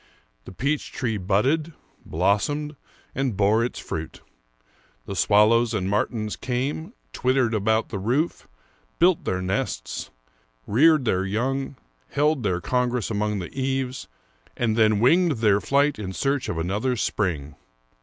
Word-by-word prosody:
The -, -, -9 dB
peach 140 Hz, +10 st, -2 dB
tree 115 Hz, -4 st, -2 dB
budded, 130 Hz, -, +1 dB, 0.3 s
blossomed, 145 Hz, -, 0 dB, 0.4 s
and 130 Hz, -7 st, -1 dB
bore 105 Hz, +3 st, +3 dB
its 120 Hz, -, -3 dB
fruit. 80 Hz, 0 st, -6 dB, 0.8 s
The 100 Hz, -, -5 dB
swallows 110 Hz, +4 st, +4 dB
and 95 Hz, -3 st, -1 dB
martins 105 Hz, +1 st, -1 dB
came, 140 Hz, -, -3 dB, 0.2 s
twittered 130 Hz, -2 st, +1 dB
about 110 Hz, +1 st, +1 dB
the 100 Hz, -, -4 dB
roof, 130 Hz, -, -1 dB, 0.5 s
built 180 Hz, -1 st, +3 dB
their 95 Hz, 0 st, -1 dB
nests, 90 Hz, -9 st, -3 dB, 0.6 s
reared 150 Hz, +5 st, +4 dB
their 95 Hz, -4 st, +1 dB
young, 130 Hz, +8 st, -2 dB, 0.4 s
held 150 Hz, -1 st, +2 dB
their 95 Hz, -5 st, 0 dB
congress 125 Hz, -1 st, 0 dB
along 105 Hz, 0 st, -1 dB
the 90 Hz, -3 st, -6 dB
eaves, 130 Hz, -1 st, -2 dB, 0.5 s
and 115 Hz, -2 st, +1 dB
then 110 Hz, -2 st, +3 dB
winged 170 Hz, +6 st, +4 dB
their 105 Hz, -4 st, +2 dB
flight 140 Hz, +1 st, +2 dB
in 95 Hz, -3 st, -5 dB
search 140 Hz, +4 st, -1 dB
of 85 Hz, -, -3 dB
another 100 Hz, +10 st, -1 dB
spring. 80 Hz, -, -2 dB
115 Hz, 135 wpm, -24 LUFS, 100-135 Hz, 0.8 s, swallows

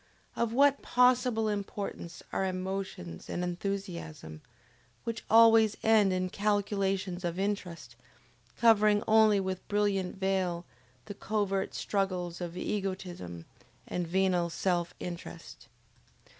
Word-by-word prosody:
of 235 Hz, -1 st, 0 dB
what 280 Hz, +3 st, +4 dB
possible 250 Hz, -3 st, +3 dB
importance 200 Hz, -4 st, -5 dB
are -, -, 0 dB
emotions 185 Hz, -, -4 dB
and 180 Hz, -, -2 dB
enthusiasm, 175 Hz, -4 st, -5 dB, 0.6 s
which 230 Hz, 0 st, -4 dB
always 225 Hz, -1 st, +6 dB
end 220 Hz, -3 st, +5 dB
in 185 Hz, 0 st, 0 dB
calculations 195 Hz, -2 st, -1 dB
of 170 Hz, 0 st, -2 dB
interest, 180 Hz, -, -3 dB, 0.6 s
covering 215 Hz, -3 st, +4 dB
only 220 Hz, -2 st, +5 dB
with 190 Hz, -1 st, -4 dB
brilliant 205 Hz, -3 st, 0 dB
veil 190 Hz, -3 st, -1 dB, 0.4 s
the -, -, -7 dB
covert 200 Hz, -2 st, -2 dB
struggles 185 Hz, -3 st, -2 dB
of 175 Hz, 0 st, -5 dB
egotism 180 Hz, -, -4 dB, 0.4 s
and 180 Hz, -1 st, -3 dB
venal 180 Hz, -1 st, +1 dB
self 175 Hz, 0 st, -1 dB
interest? 175 Hz, -1 st, -8 dB
195 Hz, 105 wpm, -30 LUFS, 180-210 Hz, 0.6 s, always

